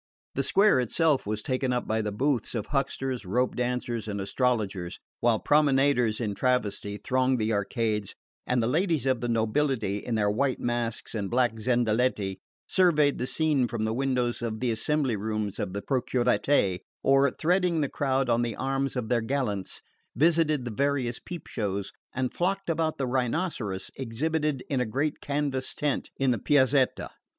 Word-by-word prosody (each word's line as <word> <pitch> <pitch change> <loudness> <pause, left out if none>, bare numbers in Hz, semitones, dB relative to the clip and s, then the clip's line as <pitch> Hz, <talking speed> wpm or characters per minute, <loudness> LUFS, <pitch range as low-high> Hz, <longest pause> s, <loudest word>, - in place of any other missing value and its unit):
The - - 0
square 200 -8 +4
itself 140 +2 +1
was 105 0 -2
taken 130 0 -1
up 125 0 -1
by 110 +1 +1
the 105 -1 -2
booths 125 +2 0
of 110 - -2
hucksters, 135 -3 -2
rope 125 +7 0
dancers 120 -2 -2
and 100 -1 -3
astrologers, 100 -4 -1 0.2
while 115 -2 +3
promenaders 135 -5 +3
in 110 -4 -1
travesty 105 -4 -1
thronged 130 +3 +1
the 110 0 0
arcades, 105 0 -1 0.3
and 125 -2 +2
the - - +1
ladies 160 +1 +1
of 130 -3 +1
the 120 - -2
nobility, 115 -2 +1
in 115 +2 -3
their 105 -1 +2
white 130 +4 0
masks 120 -1 -2
and 100 -4 -2
black 120 -2 +1
zendaletti, 115 -4 +1 0.3
surveyed 155 -6 +3
the 125 - -1
scene 150 -5 +1
from 115 -2 -3
the 110 - -1
windows 125 -2 0
of 110 -2 -3
the 125 0 0
assembly 135 +2 +1
rooms 105 -1 -3
in 95 - -2
the 100 +1 -5
Procuratie, 125 -5 +1 0.2
or, 135 +1 +5
threading 175 +2 +1
the 140 - +1
crowd 135 -1 0
on 120 0 +2
the 115 -3 -2
arms 135 +1 -1
of 125 -3 -2
their 120 0 +1
gallants, 110 -6 -2 0.3
visited 155 -2 +3
the 120 - -3
various 135 0 0
peep 175 -3 -8
shows 100 -3 -3 0.2
and 130 -1 -2
flocked 195 0 0
about 160 -1 -1
the 135 - -1
rhinoceros 125 - -2
exhibited 145 +3 -1
in 135 -3 0
a - - +1
great 140 +6 -1
canvas 140 -2 -2
tent 145 -3 -1
in 135 -2 +2
the 120 - 0
Piazzetta. 130 +1 +2
125 Hz, 170 wpm, -27 LUFS, 110-140 Hz, 0.3 s, or